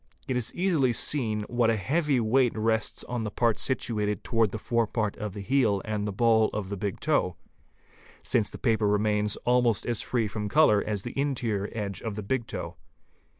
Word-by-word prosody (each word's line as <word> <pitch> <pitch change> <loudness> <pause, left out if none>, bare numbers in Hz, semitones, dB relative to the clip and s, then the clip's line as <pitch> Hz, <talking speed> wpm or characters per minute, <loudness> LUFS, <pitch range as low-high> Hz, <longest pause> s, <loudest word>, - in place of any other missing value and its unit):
It 130 - -1
is 125 -2 0
easily 165 -9 +2
seen 110 -5 +1
what 120 +1 +1
a 115 - +3
heavy 145 - +1
weight 120 +1 +2
rests 110 0 0
on 120 -1 -4
the 105 - -2
parts 115 +2 +1
situated 105 -6 -1
towards 115 -3 +1
the 110 - -4
forepart 115 -2 -1
of 105 -3 -5
the 100 - -5
heel 110 -3 +2
and 105 -1 -2
the - - -2
ball 110 +1 +3
of 105 -3 -4
the 100 - -3
big 100 0 -4
toe, 140 - +1 0.9
since 110 -4 +1
the - - -9
paper 110 -4 +1
remains 105 0 +1
almost 120 -3 +2
as 120 -2 -1
free 115 -4 -1
from 105 0 -4
colour 120 -7 +4
as 105 -3 -2
the 120 - -6
interior 120 -8 -1
edge 100 -3 -4
of 110 -3 -4
the 105 - -5
big 120 +2 -2
toe. - - -6
110 Hz, 195 wpm, -27 LUFS, 105-125 Hz, 0.9 s, colour